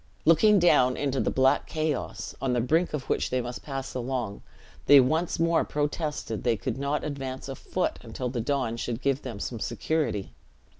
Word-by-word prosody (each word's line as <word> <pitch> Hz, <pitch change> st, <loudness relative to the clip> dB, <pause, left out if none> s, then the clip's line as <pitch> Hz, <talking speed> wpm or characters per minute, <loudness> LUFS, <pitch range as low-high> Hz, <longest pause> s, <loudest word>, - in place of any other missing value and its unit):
Looking 200 Hz, +7 st, +6 dB
down 145 Hz, -8 st, +4 dB
into 140 Hz, -2 st, -1 dB
the -, -, +1 dB
black 130 Hz, 0 st, +2 dB
chaos, 145 Hz, -9 st, -3 dB
on 130 Hz, -2 st, 0 dB
the 120 Hz, -, +2 dB
brink 155 Hz, +7 st, +1 dB
of 140 Hz, -, -4 dB
which -, -, 0 dB
they 130 Hz, -, 0 dB
must 120 Hz, 0 st, -5 dB
pass 135 Hz, -2 st, -5 dB
along, 125 Hz, -4 st, -3 dB, 0.5 s
they 145 Hz, -, +9 dB
once 160 Hz, +7 st, +1 dB
more 165 Hz, 0 st, +3 dB
protested 150 Hz, -5 st, -2 dB
they 115 Hz, -2 st, +2 dB
could 130 Hz, -, -3 dB
not 140 Hz, +1 st, -1 dB
advance 135 Hz, -3 st, -5 dB
a 135 Hz, -, -4 dB
foot, 180 Hz, +6 st, -2 dB
until 120 Hz, +2 st, -5 dB
the 120 Hz, -1 st, -2 dB
dawn 130 Hz, -3 st, -1 dB
should 120 Hz, +1 st, -4 dB
give 140 Hz, 0 st, +1 dB
them 120 Hz, -6 st, -6 dB
some 115 Hz, +2 st, -4 dB
security. 150 Hz, -7 st, -1 dB
135 Hz, 185 wpm, -27 LUFS, 125-150 Hz, 0.5 s, they